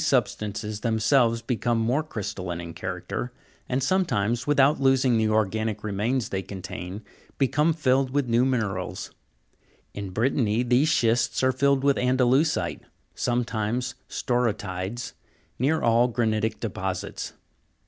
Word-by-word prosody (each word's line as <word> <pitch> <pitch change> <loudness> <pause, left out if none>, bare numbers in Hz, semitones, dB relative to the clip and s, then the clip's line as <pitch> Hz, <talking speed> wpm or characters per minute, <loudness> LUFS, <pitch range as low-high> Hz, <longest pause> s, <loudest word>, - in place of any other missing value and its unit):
substances 105 0 -1
themselves 115 +1 +2
become 120 -1 0
more 120 +6 +1
crystalline 95 - -5
in 85 -1 -7
character, 95 +7 -4 0.4
and 130 +1 0
sometimes, 125 - +1
without 140 0 +4
losing 135 -1 +4
1 115 - +3
the 110 - +2
organic 110 0 0
remains 110 +5 -1
they 95 - -2
contain, 95 +1 -7 0.3
become 150 +4 +2
filled 135 -4 +2
with 140 0 0
new 120 +1 +3
minerals; 110 -8 -2 0.8
in 100 -1 -5
Brittany 115 +2 +1
these 125 +5 +3
schists 120 -4 +2
are 130 - +4
filled 140 0 +2
with 140 -1 +3
andalu'site, 130 +5 +2 0.3
sometimes 120 0 -1 0.2
staurotides, 110 -2 -2 0.5
near 145 +6 +1
all 120 +1 +4
granitic 110 -2 0
deposits. - - -4
120 Hz, 120 wpm, -26 LUFS, 105-130 Hz, 0.8 s, without